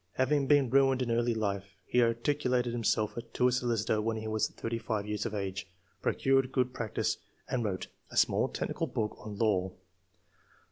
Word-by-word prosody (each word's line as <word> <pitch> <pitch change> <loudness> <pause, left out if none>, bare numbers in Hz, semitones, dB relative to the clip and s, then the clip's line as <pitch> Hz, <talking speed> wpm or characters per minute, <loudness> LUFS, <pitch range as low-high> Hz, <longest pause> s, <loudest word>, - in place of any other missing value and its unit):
Having 140 +1 +2
been 140 -4 +4
ruined 135 -1 +4
in 120 - -2
early 120 0 +2
life, 100 -2 -3
he 125 - +3
articled 125 +2 +1
himself 115 -3 0 0.2
to 125 - +3
a - - +3
solicitor 115 -3 +1
when 110 +1 -1
he 110 0 -5
was 110 0 +1
thirty 115 0 -4
five 110 -3 -2
years 105 0 -2
of 110 - -5
age; 100 -1 -3 0.3
procured 135 -1 +2
good 125 -1 +1
practice, 115 -3 -1 0.3
and 125 -2 -1
wrote 95 -4 -2 0.2
[a - - -7
small - - +4
technical - - -2
book] 105 -1 -2
on 105 -1 -7
law. 95 -4 +1
115 Hz, 175 wpm, -31 LUFS, 105-125 Hz, 0.3 s, been